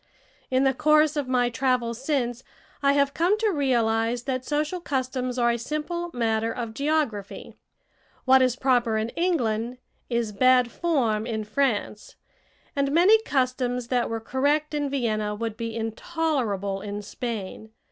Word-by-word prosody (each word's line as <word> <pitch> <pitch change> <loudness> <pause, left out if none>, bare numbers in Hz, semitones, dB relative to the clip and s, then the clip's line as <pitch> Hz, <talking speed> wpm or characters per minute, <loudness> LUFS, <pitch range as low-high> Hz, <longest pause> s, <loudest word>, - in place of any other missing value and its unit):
In 260 +1 +2
the 270 0 +3
course 305 +2 +3
of 290 -3 -2
my 245 -1 +1
travels 245 -1 0
since, 255 -4 -1 0.4
I 280 0 +4
have 280 0 +2
come 360 +6 +2
to 430 -1 +1
realize 235 - +1
that 255 -1 -2
social 300 +5 -1
customs 255 -4 -2
are 235 -1 +3
a 235 - -2
simple 305 +7 -3
matter 225 -2 0
of 230 -1 -5
geography! 275 -7 -2 0.7
What 265 0 +6
is 255 -1 +2
proper 245 -4 +2
in 220 +1 -1
England 245 -9 -1 0.3
is 235 -3 -1
bad 250 +2 +4
form 235 -11 0
in 220 -2 -2
France, 215 -2 -2 0.6
and 280 -1 +1
many 375 +8 +5
customs 255 - -1
that 245 -2 +1
were 225 0 -2
correct 285 +6 0
in 290 -1 -1
Vienna 215 -6 -1
would 225 0 -4
be 230 -1 -5
intolerable 225 - -2
in 205 0 -5
Spain. 220 -1 -6
250 Hz, 145 wpm, -25 LUFS, 225-285 Hz, 0.7 s, What